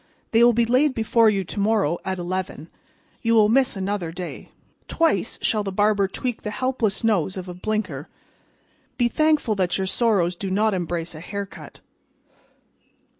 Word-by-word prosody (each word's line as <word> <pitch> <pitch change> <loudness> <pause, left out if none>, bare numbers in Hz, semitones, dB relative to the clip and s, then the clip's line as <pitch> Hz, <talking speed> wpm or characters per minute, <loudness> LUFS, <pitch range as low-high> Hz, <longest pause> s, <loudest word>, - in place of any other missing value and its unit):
They 230 +1 +5
will 240 - +7
be 235 +1 +2
laid 260 +4 +2
before 225 0 +3
you 200 -2 0
to 195 - -7
morrow 200 -6 +1
at 190 0 -3
eleven. 175 -3 -4 0.5
You 230 -1 +2
will 215 -2 +5
miss 260 +1 +3
another 190 -3 -3
day. 180 +1 -7 0.4
Twice 315 - +1
shall 215 -2 +1
the 195 - -4
barber 205 0 +2
tweak 245 +4 -4
the 210 - -4
helpless 235 -2 -1
nose 195 -4 +1
of 185 0 -6
a 180 - -6
Blinker. 180 -7 -3 0.9
Be 240 - +3
thankful 305 -2 +2
that 180 -2 0
your 190 - -1
sorrows 190 -4 +1
do 195 +2 -4
not 210 +3 +1
embrace 175 -2 -3
a 155 - -9
haircut." 200 +3 -8
205 Hz, 165 wpm, -23 LUFS, 185-230 Hz, 0.9 s, will